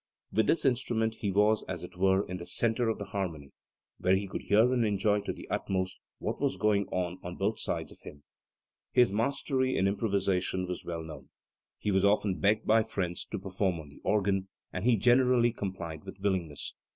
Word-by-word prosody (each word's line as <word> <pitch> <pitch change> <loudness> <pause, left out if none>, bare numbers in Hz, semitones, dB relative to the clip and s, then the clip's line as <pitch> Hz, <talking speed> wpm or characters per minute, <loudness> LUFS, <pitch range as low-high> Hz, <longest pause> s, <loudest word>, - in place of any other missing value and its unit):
"With 110 0 +3
this 165 - +2
instrument 115 -3 +1
he 100 - -1
was 105 +2 +3
as - - -4
it - - -9
were 95 +2 +3
in 90 - -5
the 85 - -8
centre 115 0 +1
of 110 - -1
the - - -5
harmony, 85 -8 -4 0.5
where 90 +1 +3
he 100 +1 -1
could - - -5
hear 110 +5 +4
and 120 -2 +2
enjoy 105 0 +2
to - - -3
the - - -9
utmost 95 -1 -1 0.2
what - - -4
was - - +1
going 100 0 +2
on 90 0 -2
on 90 0 -6
both 105 +3 -1
sides - - -3
of - - -16
him". 70 - -11 0.7
His 125 -5 +4
mastery 130 +4 0
in 95 - +3
improvisation 100 -3 0
was 90 -1 -5
well 85 -1 -4
known. 80 -1 -10 0.5
He 105 - -1
was 95 -1 +2
often 100 -1 +2
begged 105 +2 +2
by 110 +1 +5
friends 95 -6 -3
to - - -5
perform 95 -2 -1
on 75 -2 -10
the 70 - -16
organ, 100 -2 +1 0.3
and - - -3
he 125 -1 +5
generally 120 +2 +4
complied 85 -7 -5
with 95 0 -10
willingness. 95 -7 -2
100 Hz, 200 wpm, -30 LUFS, 95-110 Hz, 0.7 s, by